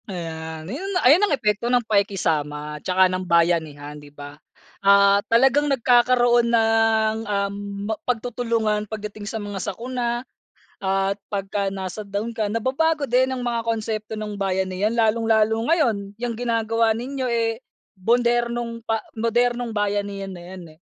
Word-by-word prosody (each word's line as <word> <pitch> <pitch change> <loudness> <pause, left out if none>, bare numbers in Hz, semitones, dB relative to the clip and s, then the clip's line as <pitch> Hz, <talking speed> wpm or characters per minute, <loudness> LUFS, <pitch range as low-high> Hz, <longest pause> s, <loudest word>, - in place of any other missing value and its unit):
Ayan, 160 -3 -6
ayun 285 - -5 0.2
ayun 295 +9 +7
ang - - +3
epekto 210 +1 0
ng 245 -2 +2
pakikisama 150 -8 -1
'tsaka 185 0 +3
ng 185 0 -1
bayan 170 -1 +3
niya 145 -1 -10
'di 145 -1 -12
ba? 145 0 -10 0.5
Ah' 200 0 +5
talagang 270 +5 +4
nagkakaroon 240 -2 +4
ng, 225 -1 +3
um, 200 -1 -1 0.3
mag 220 0 -3
pagtutulungan 225 -3 -1
pagdating 210 -1 -6
sa 225 - -4
mga 205 -2 -5
sakuna 240 +1 -3 0.5
at 195 +1 0
pagka 195 -1 -2
nasa 190 +2 -5
down 200 +3 -3
ka, 215 - +1
nababago 280 +5 0
din 260 +2 +2
ang 255 - -4
mga 235 -2 -2
konsepto 220 -1 -3
ng 215 -1 -5
bayanihan 190 +2 -1
lalong-lalo 225 -1 +2
ngayon, 225 - +1
yung 240 0 -3
ginagawa 230 -1 +1
ninyo, 260 +2 -4
eh, 230 0 0 0.4
modernong 235 +2 0
pa 225 -1 +1 0.2
modernong 240 +1 0
bayanihan 200 -1 -2
na 175 - -10
yan, 185 -1 -9
eh. - - -44
220 Hz, 140 wpm, -23 LUFS, 195-235 Hz, 0.5 s, ayun